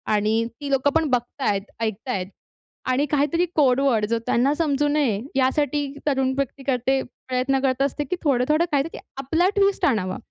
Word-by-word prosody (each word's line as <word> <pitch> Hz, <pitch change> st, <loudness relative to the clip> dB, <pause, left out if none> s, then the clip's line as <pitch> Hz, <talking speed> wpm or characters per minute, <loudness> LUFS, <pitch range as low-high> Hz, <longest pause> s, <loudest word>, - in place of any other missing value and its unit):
आणि 215 Hz, +2 st, +1 dB, 0.2 s
ती 285 Hz, -, -4 dB
लोकं 270 Hz, +1 st, +3 dB
पण 320 Hz, -1 st, +3 dB
बघत 245 Hz, +3 st, -2 dB
आहेत, 200 Hz, -4 st, +1 dB, 0.2 s
ऐकत 220 Hz, +2 st, -3 dB
आहेत 190 Hz, -6 st, -2 dB, 0.6 s
आणि 275 Hz, +3 st, +2 dB
काहीतरी 300 Hz, +4 st, +2 dB
कोड 270 Hz, -4 st, +4 dB
वर्ड, 230 Hz, -6 st, +2 dB
जो 230 Hz, +2 st, -1 dB
त्यांना 265 Hz, +4 st, +2 dB
समजू 295 Hz, -3 st, +1 dB
नये, 280 Hz, -9 st, +1 dB
यासाठी 285 Hz, +2 st, +1 dB, 0.2 s
तरुण 265 Hz, -2 st, +2 dB
व्यक्ती 275 Hz, 0 st, -3 dB
करते, 265 Hz, 0 st, +1 dB
प्रयत्न 255 Hz, +2 st, -2 dB
करत 265 Hz, -1 st, 0 dB
असते 280 Hz, +1 st, 0 dB
की 290 Hz, +6 st, -3 dB
थोडं-थोडं 295 Hz, +4 st, +2 dB
काहीतरी 290 Hz, +3 st, -1 dB, 0.2 s
आपला 320 Hz, +7 st, +1 dB
ट्विस्ट 395 Hz, -1 st, +2 dB
आणावा. 185 Hz, -8 st, 0 dB
270 Hz, 170 wpm, -23 LUFS, 245-290 Hz, 0.6 s, कोड